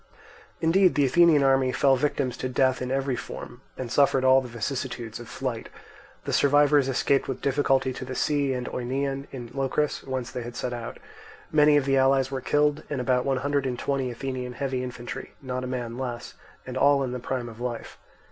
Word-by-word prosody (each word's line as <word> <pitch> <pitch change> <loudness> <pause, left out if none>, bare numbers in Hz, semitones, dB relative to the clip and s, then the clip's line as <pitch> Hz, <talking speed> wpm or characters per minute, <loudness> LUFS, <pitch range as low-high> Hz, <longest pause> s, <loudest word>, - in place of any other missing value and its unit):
Indeed 180 +3 +4
the 145 - +3
Athenian 155 +1 +5
army 135 -1 +3
fell 135 +1 +3
victims 135 -2 -1
to 130 - -3
death 130 0 +2
in 125 - -3
every 135 0 0
form, 125 +1 -8 0.2
and 125 -3 -5
suffered 140 -2 +3
all 130 0 +6
the 130 - -7
vicissitudes 120 -1 -4
of 120 - -10
flight; 125 -4 -4 0.6
the - - -2
survivors 145 -1 +4
escaped 135 +1 +1
with 135 - -3
difficulty 135 -1 +1
to 130 - -6
the 130 0 -6
sea 145 -2 +1
and 125 -1 -4
Oeneon 135 +2 -3
in 120 -3 -8
Locris, 140 +2 -1
whence 130 -2 -4
they 125 - -4
had 120 0 -7
set 125 - -3
out. 120 -1 -6 0.5
Many 150 -1 +5
of 140 - +1
the 135 0 +2
allies 135 0 +3
were 135 -1 -3
killed, 150 +2 +2
and 145 - -2
about 125 0 +1
one 135 -1 +1
hundred 140 -1 +1
and 125 -1 -3
twenty 135 0 -1
Athenian 125 0 -5
heavy 130 -1 -2
infantry, 120 -1 -7
not 130 -1 -4
a - - -3
man 120 -1 -4
less, 120 -2 -5 0.3
and 130 0 -5
all 140 0 +4
in 130 - -3
the 125 - -4
prime 125 0 -3
of 115 -1 -10
life. 120 -2 -5
130 Hz, 200 wpm, -26 LUFS, 125-140 Hz, 0.6 s, all